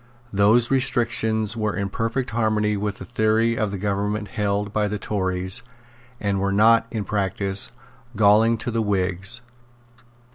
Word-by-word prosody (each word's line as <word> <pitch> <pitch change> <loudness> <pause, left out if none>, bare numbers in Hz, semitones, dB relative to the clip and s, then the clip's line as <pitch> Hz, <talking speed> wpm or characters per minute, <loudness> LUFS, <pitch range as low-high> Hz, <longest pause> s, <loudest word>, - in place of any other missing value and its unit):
Those 110 +5 +4
restrictions 110 -4 +1
were 110 -2 -1
in 100 0 -2
perfect 115 +5 -2
harmony 110 -2 +1
with 105 0 -3
the - - -8
theory 115 0 +1
of 105 -3 -2
government 105 +1 -2
held 105 -1 -2
by 105 -1 +1
the 105 +1 -3
Tories, 95 -2 -2 0.6
and 100 -2 -1
were 100 0 0
not, 115 +3 +4
in 110 -3 -3
practice, 100 0 -1 0.5
galling 110 +2 +4
to 115 +2 -4
the 115 0 0
Whigs. 95 +2 -1
105 Hz, 140 wpm, -23 LUFS, 100-115 Hz, 0.6 s, Those